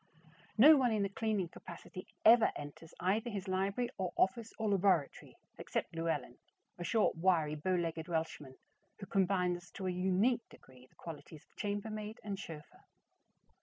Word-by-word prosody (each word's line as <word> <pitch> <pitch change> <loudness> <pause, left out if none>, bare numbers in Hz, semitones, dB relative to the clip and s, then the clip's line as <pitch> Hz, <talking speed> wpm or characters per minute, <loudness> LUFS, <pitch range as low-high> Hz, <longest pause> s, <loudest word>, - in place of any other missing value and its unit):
No 295 +7 +9
one 250 -3 +3
in 210 -2 +1
a - - -2
cleaning 205 -3 -1
capacity 175 +2 -10 0.2
ever 230 +1 +7
enters 145 +2 -9
either 210 +6 +1
his 200 -3 -5
library 195 +6 0
or 185 -2 -2
office 220 +4 +1
or 220 - -1
laboratory 190 -7 +1 0.2
except - - -3
Llewelyn, 160 -7 -2 0.4
a - - -3
short, 215 +5 +2
wiry, 165 -4 +2
bow 170 +5 0
legged 165 -2 -2
Welshman, 160 -5 -3 0.4
who 200 - -8
combines 180 -2 0
to 195 - -6
a 185 - 0
unique 190 +7 +1
degree 130 -1 -17
the - - -32
qualities 160 -1 -10
of - - -35
chambermaid 210 +1 -4
and 200 -2 -4
chauffeur. 155 -6 -10
190 Hz, 155 wpm, -34 LUFS, 165-210 Hz, 0.4 s, No